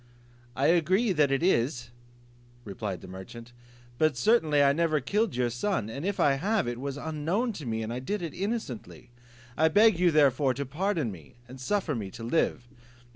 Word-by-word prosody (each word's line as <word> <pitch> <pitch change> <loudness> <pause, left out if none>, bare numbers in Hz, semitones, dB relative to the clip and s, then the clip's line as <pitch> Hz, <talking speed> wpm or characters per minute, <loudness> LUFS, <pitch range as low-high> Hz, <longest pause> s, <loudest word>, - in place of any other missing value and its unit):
"I 135 - 0
agree 180 +8 +3
it 150 -4 +2
is," 125 -7 +1 0.7
replied 100 -3 -5
the - - -11
merchant, 115 +6 -10 0.5
"but 155 -4 +2
certainly 155 - +3
I 140 0 +4
never 160 -1 +1
killed 205 - -1
your 125 -1 0
son; 120 - -2
and 140 +6 -6
if 200 +1 -2
I 140 -1 +3
have, 210 - +1
it 120 0 -4
was 140 +1 -4
unknown 160 - -2
to 155 -9 -8
me, 110 0 -2
and 110 +2 -4
I 125 - -3
did 195 +9 -3
it 165 - -5
innocently; 185 - -5 0.4
I 160 - +4
beg 205 +2 +4
you 180 -1 +4
therefore 140 -3 +3
to 140 +2 -3
pardon 155 - -1
me, 80 -7 -13
and 130 +1 -11
suffer 190 +1 -1
me 105 -6 -4
to 115 - -8
live." 120 -1 0
145 Hz, 180 wpm, -28 LUFS, 120-180 Hz, 0.7 s, I